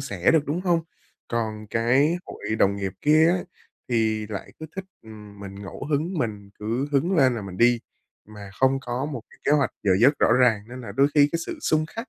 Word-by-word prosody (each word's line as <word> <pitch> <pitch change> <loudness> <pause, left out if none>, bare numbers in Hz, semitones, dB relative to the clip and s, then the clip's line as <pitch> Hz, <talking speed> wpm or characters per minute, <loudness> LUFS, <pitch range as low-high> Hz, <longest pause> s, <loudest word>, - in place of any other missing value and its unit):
sẻ 100 -10 +1
được, 160 -3 +3
đúng 160 +5 -1
không? 175 -3 +2 0.5
Còn 110 -2 -3
cái 130 +10 +2
hội 110 +1 -4
đồng 100 0 +3
nghiệp 95 -2 -3
kia 155 +2 +5
á, 180 +2 +2 0.5
thì 110 -3 0
lại 100 -2 -7
cứ 160 - -6
thích, 190 - -4 0.2
ừm, 105 -2 -12
mình 100 -1 -8
ngẫu 100 +5 -8
hứng, 155 +6 0
mình 105 -5 -3
cứ 115 +6 -2
hứng 170 +7 +2
lên 130 -4 +4
là 110 - -4
mình 95 -2 -8
đi, 120 +1 +4 0.5
mà 105 -2 -10
không 130 0 +4
có 125 +1 -3
một 120 - -5
cái - - -19
kế - - +3
hoạch 140 -5 +3
giờ 100 - +1
giấc 140 +5 +5
rõ - - +4
ràng. 120 -4 +3
Nên 125 +1 -8
là 115 - -8
đôi 140 +1 +3
khi 145 -1 +6
cái 165 - 0
sự - - -5
xung 155 0 +1
khắc 230 +8 -8
120 Hz, 225 wpm, -24 LUFS, 105-145 Hz, 0.5 s, khi